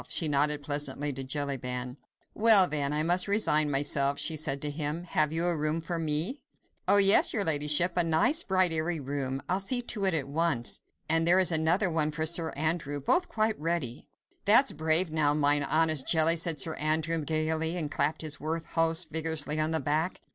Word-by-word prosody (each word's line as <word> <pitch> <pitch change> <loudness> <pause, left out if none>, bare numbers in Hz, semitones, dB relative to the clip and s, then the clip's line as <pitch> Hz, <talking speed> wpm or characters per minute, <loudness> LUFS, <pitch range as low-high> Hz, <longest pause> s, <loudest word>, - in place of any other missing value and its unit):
She 165 - +1
nodded 145 0 0
pleasantly 145 0 -3
to 135 +1 -7
Jellyband. 130 -3 -4 0.4
"Well, 210 -4 +5
then, 145 -3 -3
I 150 +1 -1
must 175 +3 0
resign 155 -8 +2
myself," 140 0 +1
she 160 - +1
said 140 -2 -1
to 145 - -2
him. 150 +2 -4
"Have 155 -3 -1
you 165 +2 -1
a 175 -1 0
room 155 +1 -2
for 165 +1 -5
me?" 160 - -2 0.5
"Oh, 205 - +4
yes, 200 0 +5
your 205 - 0
ladyship. 150 +3 +2
A 175 - +2
nice, 170 - +1
bright, 185 - +1
airy 160 +1 -2
room. 135 -1 -5
I'll 185 +2 -1
see 245 +6 +1
to 225 -4 -2
it 190 -3 +2
at 140 -4 -2
once.... 145 -5 -1 0.3
And 165 +1 +1
there 175 +2 +5
is 185 -2 +3
another 170 +4 +1
one 155 -2 0
for 155 +1 -3
Sir 165 0 0
Andrew—both 155 - -1
quite 220 -3 -2
ready." 150 -6 -4 0.4
"That's 235 +7 +4
brave 160 +2 +2
now, 150 -2 0
mine 145 -1 +2
honest 155 -1 0
Jelly," 160 0 +4
said 165 -2 0
Sir 160 +4 0
Andrew, 155 +1 -1
gaily, 160 +2 -2
and 150 -4 -4
clapping 155 +2 -2
his 150 -1 -2
worthy 160 +2 -4
host 165 +1 +2
vigorously 160 -1 -2
on 155 0 0
the 160 0 -1
back. 155 +5 -2
160 Hz, 190 wpm, -27 LUFS, 145-170 Hz, 0.5 s, Well